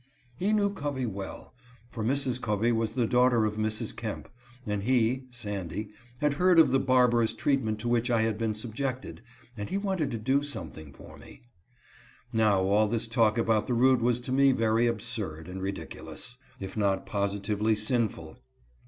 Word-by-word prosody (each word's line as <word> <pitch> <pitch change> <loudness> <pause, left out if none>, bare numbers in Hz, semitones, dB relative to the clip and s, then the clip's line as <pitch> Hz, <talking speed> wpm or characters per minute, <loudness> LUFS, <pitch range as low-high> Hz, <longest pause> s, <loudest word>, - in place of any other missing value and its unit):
He 190 - 0
knew 205 -2 +2
Covey 140 -7 -3
well, 100 -3 -7 0.4
for 110 - -4
Mrs. 130 0 0
Covey 105 +2 +1
was 115 -1 0
the 120 -1 +1
daughter 125 -1 +3
of 105 0 -2
Mrs. 110 +1 -1
Kemp; 110 -3 -5 0.4
and 105 -1 -2
he 125 +2 +1
(Sandy) 105 -4 -4 0.3
had 150 -1 +2
heard 180 +4 +3
of 155 -5 +7
the 135 - +3
barbarous 125 -3 +3
treatment 125 -7 0
to 120 - -4
which 120 +1 +1
I 115 -2 +2
had 110 -1 0
been 110 -2 -1
subjected, 125 +3 -4 0.3
and 105 -2 -5
he 195 - -1
wanted 190 -7 -1
to 120 - -3
do 130 +6 +1
something 80 - -5
for - - -14
me. - - -15 0.9
Now 105 -4 +3
all 105 +3 +3
this 115 +1 0
talk 115 -2 +2
about 110 -2 +1
the 125 - 0
root 130 +1 +4
was 120 0 +2
to 125 - -5
me 135 +1 +5
very 115 0 +2
absurd 105 -8 -2
and 95 +1 -7
ridiculous, 95 +3 -6 0.2
if 95 -1 -7
not 100 -3 0
positively 100 +1 0
sinful. 110 +1 -1
115 Hz, 170 wpm, -28 LUFS, 105-130 Hz, 0.9 s, of